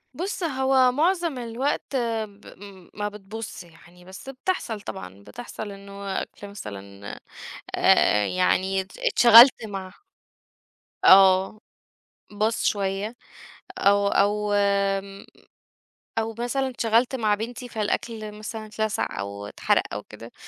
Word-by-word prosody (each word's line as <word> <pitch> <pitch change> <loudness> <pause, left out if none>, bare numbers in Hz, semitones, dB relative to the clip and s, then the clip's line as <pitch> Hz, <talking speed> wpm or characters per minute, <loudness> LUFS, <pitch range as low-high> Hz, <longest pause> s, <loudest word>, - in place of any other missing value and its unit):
بُص، 365 +2 -4
هو 265 -3 +3
معظم 335 +1 0
الوقت 250 +4 -3
ب 220 -4 -3 0.2
م 190 -3 -13
ما 210 0 -3
بتبوظش 210 +1 -8
يعني، 175 +1 -19
بس 190 +8 -11
بتحصل 255 - -3
طبعًا، 95 - -9
بتحصل 220 - -8
إنه 200 0 -6
أكل 205 - -10
مثلًا 100 - -9
أ - - -13 0.6
أ 105 -1 +4
يعني 190 +1 +1
اتش 190 +2 -10
اتشغلت 235 +1 +7
مع 190 -3 -7 1.1
آه، 190 +2 +6 0.7
باظ 215 +2 0
شوية 200 +3 -1 0.6
أو 200 0 +3
أو 205 +1 +1
آمم، 200 -1 0 0.9
أو 225 0 -2
مثلًا 265 +3 -1
اتشغلت 235 +1 +1
مع 215 -4 +1
بنتي 240 +3 -6
فالأكل 215 0 -3
مثلًا 215 +1 -7
اتلسع 215 - -3
أو 100 +1 -6
اتحرق - - +1
أو 105 - -4
كده، 115 +3 -13
205 Hz, 115 wpm, -24 LUFS, 195-235 Hz, 1.1 s, اتشغلت